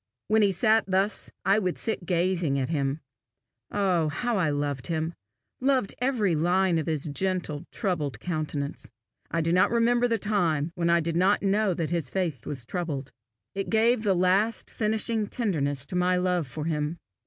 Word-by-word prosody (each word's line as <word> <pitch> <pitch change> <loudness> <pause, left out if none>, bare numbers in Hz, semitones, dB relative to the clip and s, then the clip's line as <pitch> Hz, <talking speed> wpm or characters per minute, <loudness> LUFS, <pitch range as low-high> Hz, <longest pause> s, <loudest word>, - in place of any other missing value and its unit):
When 220 0 +4
he 200 -2 +4
sat 220 +4 +3
thus, 195 +2 0 0.2
I 195 +2 +4
would 185 -4 -1
sit 205 -6 -3
gazing 175 -4 +1
at 130 0 -1
him. 140 -1 -1 0.7
Oh 185 -6 +1
how 240 +10 -1
I 180 -6 +2
loved 145 -2 -2
him 160 0 -2 0.5
loved 260 -5 +1
every 240 -8 +1
line 175 +2 +2
of 155 - -4
his 155 -1 -1
gentle, 175 -2 -2
troubled 165 - -2
countenance! 155 -4 -4 0.4
I 165 - 0
do 165 +1 +1
not 185 +3 +4
remember 235 +1 +3
the 230 -1 +1
time 175 -8 0
when 170 -1 0
I 170 0 +4
did 165 0 -2
not 185 +4 +3
know 200 -1 +2
that 160 -2 -2
his 165 -6 -1
face 165 - -2
was 130 -5 -4
troubled. 145 -5 -4 0.4
It 195 0 -3
gave 225 +1 +3
the 200 -3 +2
last 190 +5 +2
finishing 220 0 0
tenderness 145 - -1
to 180 - -7
my 180 0 +2
love 180 -4 0
for 150 +5 -5
him. 155 0 -1
180 Hz, 175 wpm, -27 LUFS, 155-205 Hz, 0.7 s, When